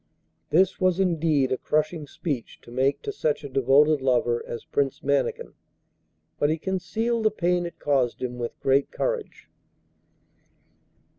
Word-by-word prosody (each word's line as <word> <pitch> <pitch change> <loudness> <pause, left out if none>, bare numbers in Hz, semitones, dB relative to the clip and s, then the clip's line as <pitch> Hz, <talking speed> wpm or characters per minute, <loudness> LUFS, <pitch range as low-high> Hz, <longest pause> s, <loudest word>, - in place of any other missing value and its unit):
This 185 +3 +3
was 185 0 +2
indeed 160 -7 +2
a 130 - 0
crushing 155 0 -1
speech 140 -5 -4
to - - -14
make 135 +3 0
to - - -3
such 150 -1 -1
a - - -5
devoted 135 +3 +4
lover 120 -2 +1
as 120 - -6
Prince 140 -2 -1
Mannikin, 445 - 0 0.9
but 145 - +3
he 160 - +1
concealed 195 +7 -1
the - - +6
pain 175 -3 0
it 170 - -11
caused 135 -5 0
him 125 -1 -4
with 120 -1 -5
great 135 +1 +2
courage. - - -3
150 Hz, 145 wpm, -25 LUFS, 135-180 Hz, 0.9 s, the